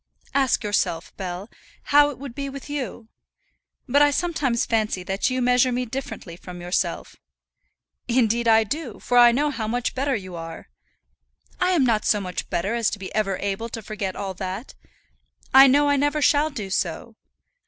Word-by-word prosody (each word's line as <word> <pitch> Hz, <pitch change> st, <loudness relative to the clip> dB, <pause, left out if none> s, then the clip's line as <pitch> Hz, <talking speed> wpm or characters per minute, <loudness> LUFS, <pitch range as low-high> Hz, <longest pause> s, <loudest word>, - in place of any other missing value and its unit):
"Ask 270 Hz, -3 st, +2 dB
yourself, 195 Hz, -5 st, -1 dB
Bell, 185 Hz, +1 st, -5 dB, 0.5 s
how 290 Hz, 0 st, +7 dB
it 290 Hz, -, -7 dB
would 270 Hz, -2 st, -8 dB
be 275 Hz, +1 st, -4 dB
with 275 Hz, +1 st, -9 dB
you. 250 Hz, -5 st, -5 dB, 0.8 s
But 280 Hz, +3 st, +3 dB
I 290 Hz, -, +6 dB
sometimes 285 Hz, -6 st, 0 dB
fancy 215 Hz, -5 st, 0 dB
that 195 Hz, +6 st, -1 dB
you 255 Hz, 0 st, -1 dB
measure 250 Hz, +1 st, +3 dB
me 250 Hz, +1 st, -1 dB
differently 245 Hz, -8 st, -6 dB
from 180 Hz, 0 st, -10 dB
yourself." 175 Hz, +1 st, -2 dB, 0.9 s
"Indeed 235 Hz, -1 st, +2 dB
I 225 Hz, 0 st, +6 dB
do, 265 Hz, +1 st, -5 dB
for 245 Hz, -, +2 dB
I 240 Hz, 0 st, +8 dB
know 290 Hz, +5 st, +1 dB
how 220 Hz, -6 st, -4 dB
much 245 Hz, +2 st, -1 dB
better 270 Hz, +1 st, 0 dB
you 185 Hz, -4 st, -6 dB
are." 165 Hz, -1 st, -8 dB, 0.9 s
"I 365 Hz, 0 st, +2 dB
am 325 Hz, -6 st, +3 dB
not 225 Hz, -3 st, +2 dB
so 210 Hz, -, +2 dB
much 180 Hz, -3 st, -5 dB
better 195 Hz, +6 st, -1 dB
as 235 Hz, -2 st, +1 dB
to -, -, -5 dB
be 190 Hz, -1 st, -8 dB
ever 195 Hz, -3 st, 0 dB
able 200 Hz, +3 st, -3 dB
to 225 Hz, -1 st, -7 dB
forget 200 Hz, -3 st, -4 dB
all 195 Hz, -1 st, -4 dB
that. 190 Hz, +6 st, -6 dB, 0.8 s
I 270 Hz, +1 st, +9 dB
know 290 Hz, +2 st, +4 dB
I 285 Hz, 0 st, +3 dB
never 290 Hz, +2 st, +1 dB
shall 295 Hz, +1 st, +3 dB
do 215 Hz, -10 st, -6 dB
so. 190 Hz, +5 st, -2 dB
235 Hz, 180 wpm, -23 LUFS, 195-275 Hz, 0.9 s, I